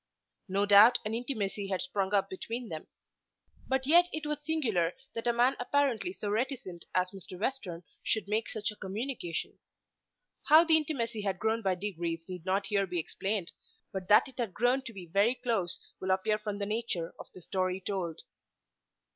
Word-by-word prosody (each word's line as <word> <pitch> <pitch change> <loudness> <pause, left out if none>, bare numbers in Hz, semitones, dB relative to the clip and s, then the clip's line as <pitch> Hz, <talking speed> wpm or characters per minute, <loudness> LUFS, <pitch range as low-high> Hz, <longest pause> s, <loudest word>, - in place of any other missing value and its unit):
No 200 +1 +1
doubt 205 +4 +8
an 215 - -2
intimacy 215 -5 -2
had 190 -1 -1
sprung 200 -7 -1
up 195 -1 +3
between 225 +5 -5
them. 155 -1 -6 0.8
But 265 0 0
yet 345 +5 +6
it 315 -1 -4
was 300 -1 -2
singular 225 - +1 0.2
that 230 +1 -3
a - - +5
man 240 +3 +3
apparently 280 +4 +1
so 290 - -6
reticent 215 - -2
as 185 0 +2
Mr. 185 -2 -10
Western 195 -8 -3 0.2
should 220 -2 0
make 215 +2 0
such 215 0 -2
a - - -11
communication. 205 - -4 0.9
How 315 +2 +8
the 325 -1 +5
intimacy 250 -8 0
had 195 -2 -1
grown 220 +3 0
by 190 -3 +1
degrees 170 -4 -3
need 180 -1 -8
not 195 +2 +1
here 195 -1 +1
be 175 -1 -3
explained, 190 +3 -2 0.4
but 190 -2 -4
that 210 +6 +6
it 265 - -13
had 225 -6 -2
grown 245 +3 +3
to 235 - -5
be 190 -5 -9
very 200 +8 +3
close 225 -9 0 0.2
will 190 - -4
appear 190 +3 +2
from 210 -1 -4
the 200 - -2
nature 210 -6 -2
of - - -9
the 185 - -10
story 185 +1 -1
told. 185 -4 -3
210 Hz, 180 wpm, -31 LUFS, 190-245 Hz, 0.9 s, doubt